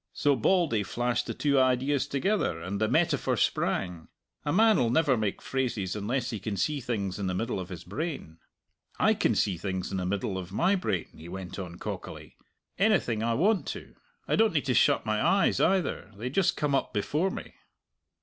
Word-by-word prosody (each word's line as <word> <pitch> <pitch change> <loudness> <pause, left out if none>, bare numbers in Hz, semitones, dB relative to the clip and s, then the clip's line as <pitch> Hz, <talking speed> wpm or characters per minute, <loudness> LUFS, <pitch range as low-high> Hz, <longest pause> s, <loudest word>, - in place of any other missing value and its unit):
So 145 -1 +2
Bauldy 145 - +2
flashed 120 +4 -1
the - - -4
two 140 -2 +2
ideas 130 +2 +2
together, 140 - 0
and 95 +5 -4
the 110 - +3
metaphor - - +1
sprang! 85 -3 -1 0.4
A 145 - -1
man'll 210 - +4
never 145 +1 +3
make 110 -4 -2
phrases 120 -8 -2
unless 120 +5 -2
he 110 - -4
can 100 0 -4
see 145 +10 0
things 105 -6 -3
in 100 - -2
the 90 - -1
middle 115 +2 -2
of 90 - -6
his 85 -3 -7
brain. 140 - -5 0.6
I - - +4
can - - +1
see 95 -4 +1
things 95 0 -3
in 95 - -2
the 90 -1 -2
middle 95 0 -2
of 90 -1 -8
my 175 - +2
brain," 140 - -1
he 80 +2 -11
went 95 0 -7
on 90 -3 -6
cockily - - -7 0.4
"anything 180 - +2
I 115 0 +1
want 200 - +2
to! - - -13 0.3
I - - +2
don't 225 -3 +3
need 150 -4 0
to 130 - +1
shut - - +3
my 110 0 0
eyes 195 0 +3
either. 185 - +1
They 120 +4 -4
just 180 +3 +2
come 145 -2 0
up 135 - 0
before 150 - 0
me." - - -7
120 Hz, 195 wpm, -28 LUFS, 95-150 Hz, 0.6 s, man'll